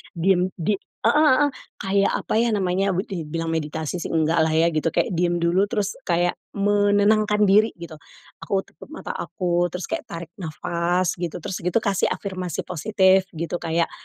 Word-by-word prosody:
diem 180 +1 +2
di 195 +4 -1
heeh 230 - -1
heeh, 295 0 +4 0.3
kayak 195 0 +1
apa - - -3
ya 235 - +2
namanya, 190 0 0
dibilang 165 -3 -4
meditasi 160 +1 -3
sih - - -4
enggaklah 160 0 +2
ya 165 +1 +3
gitu, 155 0 -1
kayak - - +1
diem 175 -1 0
dulu 185 +4 +3
terus 210 -2 -2
kayak 175 0 +1 0.2
menenangkan 205 +1 +3
diri 210 +3 +4
gitu, 170 -2 -10 0.4
aku 195 -1 -1
tutup - - -15
mata - - -5
aku, 175 -2 -1
terus 180 - -5
kayak 325 -1 -3
tarik 170 0 -7
nafas 175 +1 -1
gitu, 175 -3 -3
terus 190 - -4
gitu 180 +6 0
kasih 200 -2 +1
afirmasi 185 -4 -4
positif 190 +1 +2
gitu, 170 +2 -3
kayak 165 0 0
180 Hz, 160 wpm, -23 LUFS, 170-200 Hz, 0.4 s, heeh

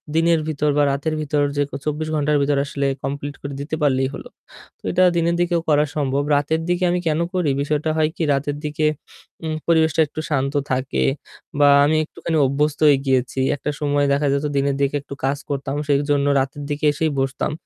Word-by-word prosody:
দিনের 165 0 +3
ভিতর 150 -1 0
বা 145 - +4
রাতের 145 +3 -2
ভিতর 145 -1 0
যে 145 - +2
ক - - -42
২৪ 155 +1 -2
ঘণ্টার 150 0 +2
ভিতর 140 0 +1
আসলে 140 0 -3 0.2
complete 145 +1 -4
করে 140 0 -6
দিতে 155 +2 -3
পারলেই 130 -2 +2
হলো। - - -8 0.5
তো - - -44
এটা 185 +1 +3
দিনের 170 0 +1
দিকেও 175 -1 +1
করা 150 0 +4
সম্ভব। 140 -1 0
রাতের 150 +3 0
দিকে 175 +1 +1
আমি 180 - +1
কেন 155 0 +1
করি? 180 -5 +1
বিষয়টা 150 +2 -1
হয় 155 0 +2
কি? - - -2
রাতের 145 +1 -1
দিকে 150 +1 -1 0.6
উম 155 -1 -2
পরিবেশটা 160 -1 +3
একটু 150 - -8
শান্ত 140 -2 0 0.2
থাকে 130 0 0 0.6
বা 145 - +6 0.2
আমি 155 +2 +2
একটুখানি 160 +1 -3
অভ্যস্ত 145 +2 0
হয়ে 145 -2 +6
গিয়েছি। 130 -1 0 0.2
একটা 145 - -4
সময় 145 -1 +1
দেখা 145 +1 +1
যেত 140 +1 -1
দিনের 140 0 +1
দিকে 140 +1 +1
একটু 140 - -9
কাজ 140 +1 0
করতাম 140 0 -3
সেইজন্য 145 0 +1
রাতের 135 +2 -3
দিকে 145 +1 -2
এসেই 155 +1 0
বসতাম। 135 +2 -1
145 Hz, 195 wpm, -21 LUFS, 140-155 Hz, 0.6 s, বা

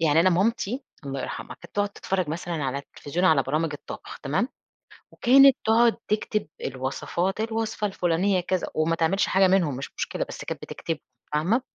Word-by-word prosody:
يعني 160 0 +4
أنا 185 +2 +5
مامتي- 230 +7 0 0.2
الله 135 -1 -3
يرحمها- - - -5
كانت - - -14
تقعد 205 0 +1
تتفرج 190 -3 -2
مثلًا 170 +2 -3
على 135 +1 -1
التلفزيون 145 +5 -4
على 155 -6 +5
برامج 155 +3 -1
الطبخ 145 - -8
تمام؟ 155 - 0 0.6
وكانت 270 +2 +6
تقعد 230 +1 +4
تكتب 215 -1 0 0.2
الوصفات 135 +9 -2
الوصفة 225 -1 -1
الفلانية 185 0 +1
كذا 180 0 -1
وما 160 +1 +2
تعملش 170 +5 +2
حاجة 190 0 +4
منهم 175 -8 +2
مش 135 - -6
مشكلة - - -2
بس - - -7
كانت - - -5
بتكتبهم - - -4 0.3
فاهمة؟ 185 - +2
180 Hz, 165 wpm, -26 LUFS, 155-215 Hz, 0.6 s, وكانت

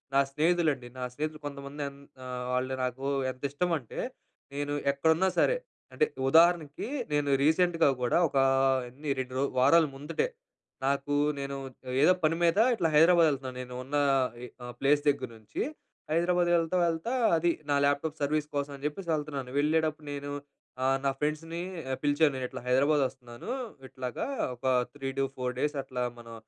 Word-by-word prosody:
నా - - +6
స్నేహితులండి. 155 -4 +1
నా 125 - -4
స్నేహితులు 155 +1 -4
కొంతమంది 140 +1 -6
ఎం 140 - -16 0.3
ఆహ్, 125 0 -4
వాళ్ళు 130 +1 0
నాకు 130 +2 -3 0.3
ఎంత 130 +2 -15
ఇష్టం 175 +4 -1
అంటే 120 - -9 0.6
నేను 145 0 -2 0.2
ఎక్కడున్నా 160 +6 +3
సరే - - +3 0.4
అంటే 455 - +3 0.2
ఉదాహరణకి 165 0 +4 0.3
నేను 145 -1 +1
రీసెంట్‌గా 165 +2 +3
కూడా 125 - +2
ఒకా 135 -1 +2 0.5
ఎన్ని 145 +4 -7
2 130 -1 -4
రో - - +1 0.2
వారాల 145 +6 +6
ముందటే, 150 - -2 0.6
నాకు 140 +1 0 0.2
నేను 140 0 -4 0.5
ఏదో 180 +5 +7
పని 155 +1 +3
మీద 170 +5 +4 0.2
ఇట్లా 170 -7 +1
హైదరాబాద్ 165 +2 +6
వెళ్తున్నాను. 130 -3 -4
నేను 125 0 -8
ఉన్న 145 +3 -2 0.5
ఈ - - -6 0.2
ఆహ్, 120 - -7
ప్లేస్ 145 +1 +3
దగ్గర 130 -3 -1
నుంచి 110 - -6 0.5
హైదరాబాద్ 175 +1 +2
వెళ్తా 165 +2 +1
వెళ్తా 165 +8 -2 0.3
అది 170 +1 +2 0.2
నా - - +4
ల్యాప్‌టాప్ 145 +2 0
సర్వీస్ 150 +1 0
కోసం 140 0 -1
అని 140 - -14
జెప్పేసి 170 +3 -6
వెళ్తున్నాను. 145 -4 -3
వెళ్ళేటప్పుడు 155 0 +1
నేను 145 0 -5 0.5
ఆహ్, 135 +1 +3
నా - - +4
ఫ్రెండ్స్‌ని 165 +3 -2 0.4
పిలిచాను. 145 0 +3
నేను 130 - -3
ఇట్లా - - -7
హైదరాబాద్ 140 +3 +4
వస్తున్నాను. 125 - -9 0.4
ఇట్లాగా 130 -2 -4 0.3
ఒక 125 +3 -12 0.3
3-4 135 -2 -3
డేస్ 150 0 0
అట్లా 125 -2 -3 0.2
మనం 115 -1 -11
145 Hz, 155 wpm, -29 LUFS, 135-160 Hz, 0.6 s, ఏదో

